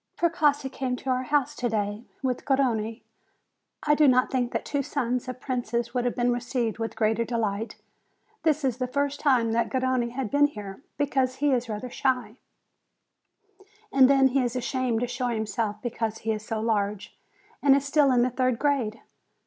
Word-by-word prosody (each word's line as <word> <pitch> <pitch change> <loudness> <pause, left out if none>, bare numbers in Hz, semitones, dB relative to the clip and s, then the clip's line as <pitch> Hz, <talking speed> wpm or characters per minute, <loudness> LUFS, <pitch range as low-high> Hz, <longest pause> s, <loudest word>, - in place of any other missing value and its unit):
Precossi 300 -5 +2
came 260 -1 -3
to 260 +1 -3
our 255 0 +1
house 280 +1 0
to 245 - -1
day 210 0 -2 0.2
with 255 -2 -1
Garrone. 230 -5 0 0.8
I 295 - +4
do 300 0 +5
not 255 -1 +4
think 250 -2 0
that - - -3
two 285 - -1
sons 250 -3 -2
of 255 -1 -6
princes 240 -3 -2
would 245 -1 0
have 245 - 0
been 245 0 +2
received 240 -2 -2
with 225 0 -3
greater 220 +1 +1
delight. 225 -2 -2 0.7
This 310 -2 +1
is 255 -3 0
the 255 - -1
first 285 +2 -1
time 250 -6 +3
that 235 +1 +1
Garrone 255 -2 0
has 260 -4 -3
been 290 0 +5
here, 205 -5 -9 0.2
because 265 -3 +1
he 290 +1 +1
is 245 -2 0
rather 220 +3 -5
shy, 250 -5 -1 1.5
and 265 -1 +6
then 270 -1 +5
he 270 +1 +2
is 245 -1 -1
ashamed 250 -2 -1
to 245 - 0
show 245 +1 -2
himself 220 -2 -2
because 225 -2 -2
he 225 - -2
is 215 -1 -3
so 220 0 -3
large, 210 -2 -1 0.5
and 275 -1 +6
is 280 0 0
still 280 -1 +4
in 245 -1 +4
the 250 - 0
third 255 -1 +1
grade. 255 -6 0
250 Hz, 185 wpm, -26 LUFS, 225-270 Hz, 1.5 s, and